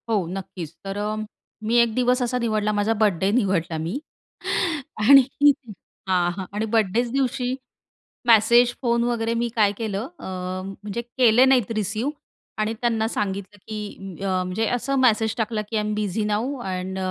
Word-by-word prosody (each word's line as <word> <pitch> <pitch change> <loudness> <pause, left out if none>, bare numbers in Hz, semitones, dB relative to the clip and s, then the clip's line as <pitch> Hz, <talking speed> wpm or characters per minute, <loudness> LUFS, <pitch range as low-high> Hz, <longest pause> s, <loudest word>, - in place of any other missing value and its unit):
हो, 205 -5 +1
नक्कीच 180 -3 -6
तर 195 0 -5
अ, 210 +1 -2 0.5
मी 225 +2 0
एक 235 -2 +1
दिवस 250 0 +2
असा 250 0 0
निवडला 215 -3 0
माझा 205 +2 +1
बर्थडे 190 -2 +2
निवडला 190 -8 +1
मी 165 - -3 1.0
आणि 275 +4 +9 0.9
हां, 175 -2 +2
हां 190 - -4
आणि 210 +2 -1
बर्थडेच्या 225 +2 +1
दिवशी 260 -1 0 0.7
मेसेज 235 +2 +6
फोन 235 -2 +2
वगैरे 230 -1 0
मी 235 +1 0
काय 210 -3 +4
केलं 220 0 -3
अ, - - -9 0.5
म्हणजे 205 +3 -5
केले 240 0 +4
नाहीत 255 -6 +3
रिसिव्ह. 215 +5 -1 0.5
आणि 215 +1 0
त्यांना 225 -2 +1
सांगितलं 200 -2 -3
की 205 -4 -7
अ, 185 -1 0
म्हणजे 185 +5 -1
असं 275 +3 -2
मेसेज 225 -3 +3
टाकला 225 -1 -1
की 225 - -1
I - - +2
am 210 0 -2
busy 210 0 -1
now 225 +7 -1
and 190 -3 -4
220 Hz, 160 wpm, -23 LUFS, 195-235 Hz, 1.0 s, आणि